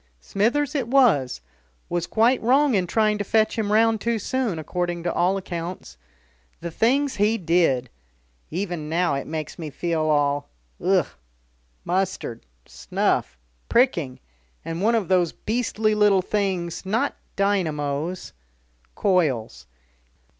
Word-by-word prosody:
"Smithers 245 Hz, -, 0 dB
it 270 Hz, -6 st, -1 dB
was 225 Hz, -, +3 dB, 0.5 s
was 175 Hz, -1 st, -2 dB
quite 235 Hz, +4 st, +3 dB
wrong 270 Hz, +4 st, +3 dB
in 185 Hz, -4 st, +1 dB
trying 215 Hz, +2 st, +1 dB
to -, -, 0 dB
fetch 220 Hz, +2 st, +2 dB
him 215 Hz, -2 st, -1 dB
round 225 Hz, 0 st, +3 dB
too 235 Hz, 0 st, 0 dB
soon, 235 Hz, -3 st, -1 dB
according 175 Hz, +2 st, -3 dB
to 175 Hz, -, -1 dB
all 180 Hz, +3 st, +2 dB
accounts. 175 Hz, -, -6 dB, 0.6 s
The 170 Hz, 0 st, -5 dB
things 265 Hz, -, +1 dB
he 210 Hz, +3 st, +2 dB
did! 165 Hz, -, +2 dB, 0.6 s
Even 175 Hz, -4 st, -4 dB
now 170 Hz, -1 st, +1 dB
it 140 Hz, -, -3 dB
makes 155 Hz, +1 st, -5 dB
me 160 Hz, -2 st, -5 dB
feel 165 Hz, +2 st, -2 dB
all 145 Hz, -2 st, +1 dB, 0.3 s
ugh! 185 Hz, -3 st, +3 dB, 0.8 s
Mustard, 180 Hz, -, -2 dB, 0.2 s
snuff, 65 Hz, -1 st, -1 dB, 0.3 s
pricking. 170 Hz, -, +2 dB, 0.5 s
And 165 Hz, +1 st, -4 dB
one 230 Hz, +3 st, +3 dB
of 215 Hz, -6 st, 0 dB
those 180 Hz, -3 st, +2 dB
beastly 220 Hz, -1 st, -1 dB
little 205 Hz, -3 st, +4 dB
things, 185 Hz, -4 st, -2 dB
not 225 Hz, +9 st, 0 dB, 0.2 s
dynamos 170 Hz, -4 st, -1 dB, 0.3 s
" -, -, -39 dB
"Coils." 150 Hz, -, 0 dB
185 Hz, 130 wpm, -24 LUFS, 160-220 Hz, 0.8 s, little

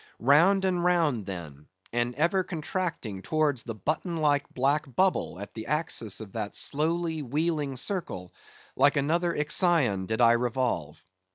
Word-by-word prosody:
Round 175 Hz, +9 st, +4 dB
and 180 Hz, -2 st, 0 dB
round, 160 Hz, -, +1 dB
then, 80 Hz, -6 st, -8 dB, 0.3 s
and 120 Hz, +1 st, 0 dB
ever 175 Hz, +5 st, +2 dB
contracting 160 Hz, -, -4 dB
towards 150 Hz, -1 st, 0 dB
the 115 Hz, -2 st, -6 dB
button 155 Hz, -, -2 dB
like 145 Hz, -2 st, +1 dB
black 140 Hz, 0 st, 0 dB
bubble 185 Hz, -, +1 dB
at 100 Hz, -, -8 dB
the 110 Hz, -1 st, -7 dB
axis 145 Hz, -, 0 dB
of 105 Hz, -3 st, -9 dB
that 105 Hz, -2 st, -4 dB
slowly 160 Hz, +2 st, -1 dB
wheeling 150 Hz, +1 st, -1 dB
circle, 130 Hz, -, -4 dB, 0.4 s
like 140 Hz, +3 st, +4 dB
another 165 Hz, +5 st, +1 dB
Ixion 150 Hz, -, +2 dB
I -, -, -5 dB
did 110 Hz, 0 st, -2 dB
revolve. 115 Hz, -, +1 dB
145 Hz, 145 wpm, -27 LUFS, 115-165 Hz, 0.4 s, Round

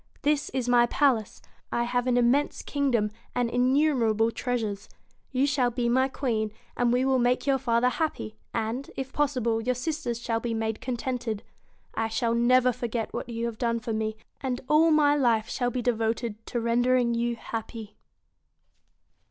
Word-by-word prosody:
This 295 Hz, 0 st, +1 dB
is 255 Hz, -2 st, -2 dB
my 240 Hz, -1 st, +5 dB
palace, 245 Hz, -6 st, +1 dB, 0.3 s
I 235 Hz, -, +1 dB
have 245 Hz, +1 st, -1 dB
an 245 Hz, -1 st, +3 dB
im 240 Hz, -1 st, +4 dB
mense 285 Hz, +2 st, 0 dB
kingdom 250 Hz, -7 st, 0 dB, 0.2 s
and 240 Hz, -1 st, 0 dB
innumerable 245 Hz, -4 st, +2 dB
treasures. 225 Hz, -5 st, -3 dB, 0.4 s
You 265 Hz, +1 st, +2 dB
shall 275 Hz, -4 st, +2 dB
be 240 Hz, 0 st, -1 dB
my 260 Hz, +2 st, +3 dB
queen, 225 Hz, -6 st, -1 dB, 0.2 s
and 240 Hz, -1 st, +2 dB
we 250 Hz, +2 st, +2 dB
will 265 Hz, -1 st, +3 dB
make 245 Hz, +1 st, +1 dB
your 275 Hz, -1 st, +2 dB
father 240 Hz, -1 st, +2 dB
happy, 180 Hz, -, -3 dB, 0.2 s
and, 230 Hz, +4 st, -3 dB
if 265 Hz, 0 st, -5 dB
possible, 250 Hz, -6 st, 0 dB
your 250 Hz, +2 st, 0 dB
sisters 255 Hz, -3 st, -3 dB
shall 230 Hz, -1 st, -1 dB
be 230 Hz, 0 st, -3 dB
made 220 Hz, -1 st, -2 dB
contented. 245 Hz, -3 st, -3 dB, 0.5 s
I 225 Hz, -, -1 dB
shall 230 Hz, +1 st, 0 dB
never 250 Hz, +2 st, +4 dB
forget 235 Hz, -2 st, -3 dB
what -, -, -4 dB
you 230 Hz, 0 st, -3 dB
have 230 Hz, -2 st, -5 dB
done 235 Hz, -1 st, 0 dB
for 230 Hz, -1 st, -4 dB
me, 220 Hz, 0 st, -2 dB, 0.3 s
and 255 Hz, -2 st, -2 dB
all 315 Hz, +2 st, +5 dB
my 295 Hz, -2 st, +4 dB
life 235 Hz, -6 st, +2 dB
shall 245 Hz, -1 st, 0 dB
be 245 Hz, 0 st, -3 dB
devoted 225 Hz, -1 st, -1 dB
to 240 Hz, -, -2 dB
rendering 240 Hz, +1 st, +2 dB
you 235 Hz, 0 st, 0 dB
happy.' 225 Hz, -1 st, -7 dB
240 Hz, 170 wpm, -27 LUFS, 230-255 Hz, 0.5 s, my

